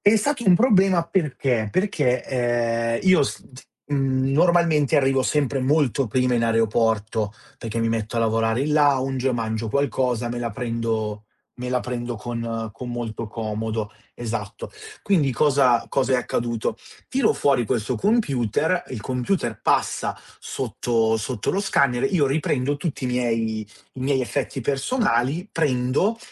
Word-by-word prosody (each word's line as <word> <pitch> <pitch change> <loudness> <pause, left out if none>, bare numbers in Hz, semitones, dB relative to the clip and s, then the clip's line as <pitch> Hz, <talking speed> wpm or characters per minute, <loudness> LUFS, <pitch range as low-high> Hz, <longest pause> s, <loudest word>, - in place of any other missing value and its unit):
È 205 +2 +5
stato 235 +3 -1
un 185 - +7
problema 190 -5 +4
perché: 135 - 0
perché, 150 - +1
ehm, 115 -2 0
io 185 -4 +5
s 135 - -3
t 130 - -12 0.3
mhmm, 135 -1 +1
normalmente 165 -2 +3
arrivo 135 -1 +3
sempre 140 -1 0
molto 140 -1 +2
prima 125 +3 +1
in 115 - +1
aeroporto 110 -2 +1 0.3
perché 115 0 -4
mi 115 - +1
metto 115 0 -2
a - - +2
lavorare 115 +1 +1
in 150 +1 -1
lounge 135 -3 +2
mangio 110 -1 -2
qualcosa, 125 -2 0
me 120 - -4
la 120 -1 -2
prendo 115 -2 -3 0.3
me 125 0 -5
la 125 0 +1
prendo 120 -1 -4
con 115 -1 -4
con 125 +4 -7
molto 115 -1 -4
comodo. 110 -1 -3 0.2
Esatto. 110 -3 -5 0.3
Quindi 160 -10 +2
cosa 135 -3 +3
cosa 135 -1 +1
è - - +5
accaduto: 120 -2 -2 0.3
tiro 260 -3 +2
fuori 135 -4 +2
questo 120 +1 -1
computer, 160 - +1
il 125 - -6
computer 125 - -2
passa - - 0 0.2
sotto 115 -2 -1
sotto 110 0 -2
lo 195 - 0
scanner, 130 -10 +2
io 155 -7 +3
riprendo 140 -1 0
tutti 145 -3 -4
i - - +1
miei 115 -3 0 0.3
i 130 - -10
miei 135 0 +1
effetti 135 +2 -3
personali, 140 - 0
prendo, 145 - +1
125 Hz, 145 wpm, -23 LUFS, 115-145 Hz, 0.3 s, un